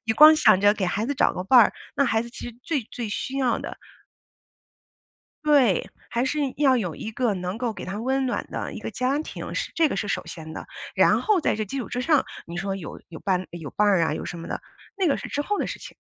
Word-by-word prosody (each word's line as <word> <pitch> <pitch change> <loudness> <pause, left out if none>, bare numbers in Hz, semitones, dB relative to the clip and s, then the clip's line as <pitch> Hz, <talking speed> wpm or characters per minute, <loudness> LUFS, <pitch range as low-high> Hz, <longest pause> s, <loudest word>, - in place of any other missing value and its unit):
你 225 - +1
光 305 +6 +9
想 190 - +6
着 205 +1 +6
给 190 -3 -1
孩 205 +4 -1
子 285 - -1
找 - - +3
个 180 - -4
伴 245 +6 +7
儿， 225 - +5 0.2
那 280 - +3
孩 225 -1 +2
子 235 - -10
其 240 - -7
实 235 - -12
最 295 -6 -1
最 235 -3 -4
需 265 +5 -3
要 255 -3 +2
的 - - -6 1.7
对， 275 - +4 0.2
还 240 +2 0
是 295 +3 -1 0.2
要 270 -3 +5
有 180 -9 -2
一 220 - -6
个 235 0 0
能 180 +1 -4
够 240 -1 -2
给 - - -8
他 195 +3 -4
温 265 +2 0
暖 245 - -2
的 - - -4
一 - - -6
个 - - -5
家 255 +3 0
庭 315 - -6
是， - - -3
这 325 -2 +4
个 - - -3
是 205 - -2
首 200 - -2
先 160 -2 -8
的。 - - -7 0.3
然 - - +4
后 425 -4 +3
在 300 - +1
这 215 - -1
基 240 +7 -5
础 250 - -4
之 245 - -2
上， 300 +1 +3 0.2
你 170 - -7
说 195 +1 -2
有 175 -6 -8
有 165 - -9
伴 185 -2 0
有 165 -5 -7
伴 210 0 +2
儿 190 -4 +4
啊， 160 - 0
有 - - -5
什 175 - -6
么 165 - -7
的。 - - -3 0.4
那 370 - +3
个 280 - +2
是 - - -7
之 290 - -2
后 410 +8 -1
的 - - 0
事 - - -5
情。 - - -11
230 Hz, 280 characters per minute, -25 LUFS, 190-270 Hz, 1.7 s, 光